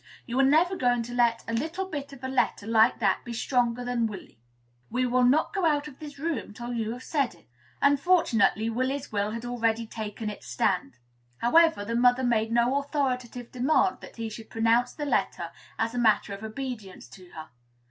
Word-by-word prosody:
You 245 +2 -2
are - - +6
never 320 +7 +4
going 245 -6 +1
to 240 +1 -8
let 235 -1 +2
a 230 - -3
little 320 +10 -2
bit 290 -6 -6
of 270 -2 -13
a - - -2
letter 260 -5 0
like 225 +2 +4
that 195 -4 +1
be 240 - -6
stronger 245 0 0
than 240 -2 0
Willy. 195 - -10 0.5
We 255 +2 0
will 250 +1 +2
not 260 +5 +3
go 390 -3 -1
out 300 -3 +2
of 280 -3 -13
this 295 -2 -9
room 280 -8 -3
till 240 +1 -5
you 225 -2 -2
have 250 +1 -9
said 280 - -1
it." 170 - -24 0.4
Unfortunately, 280 - +3
Willy's 255 +4 -2
will 205 -1 0
had 230 +2 -5
already 230 -2 0
taken 215 0 -6
its 210 - -7
stand. 180 -10 -1 0.4
However, 320 - +4
the 230 - -3
mother 245 +2 +4
made 225 -2 +1
no 240 +4 +3
authoritative 255 -4 -3
demand 300 +9 +2
that - - -12
he 230 -1 -4
should 220 +1 -9
pronounce 230 +2 +2
the 295 - -5
letter 285 - -1 0.3
as 225 +1 -1
a 245 - -2
matter 215 -3 +2
of 200 - -8
obedience 220 - -6
to 180 +8 -14
her. 160 0 -9
245 Hz, 200 wpm, -27 LUFS, 225-275 Hz, 0.5 s, are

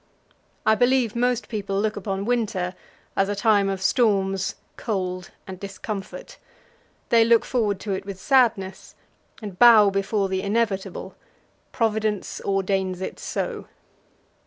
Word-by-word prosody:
I 220 - +5
believe 245 -1 +2
most 245 0 0
people 200 -3 -3
look 215 +1 0
upon 195 -1 -3
winter 210 -7 -1 0.4
as 195 0 +1
a 205 - -1
time 200 -1 +3
of 190 -1 -3
storms, 195 -4 +1 0.2
cold, 185 -4 -3 0.2
and 190 -1 -8
discomfort. 195 0 -7 0.7
They 230 -1 +6
look 230 0 +4
forward 210 -6 0
to 210 - -4
it 190 - -3
with 195 -1 -8
sadness, 225 -7 +1 0.5
and 200 -4 -7
bow 220 -4 +8
before 195 +1 0
the 190 0 -2
inevitable 200 -1 -2 0.6
Providence 215 -3 -1
ordains 190 -1 -1
it 190 - -6
so. - - -4
200 Hz, 130 wpm, -24 LUFS, 190-225 Hz, 0.7 s, bow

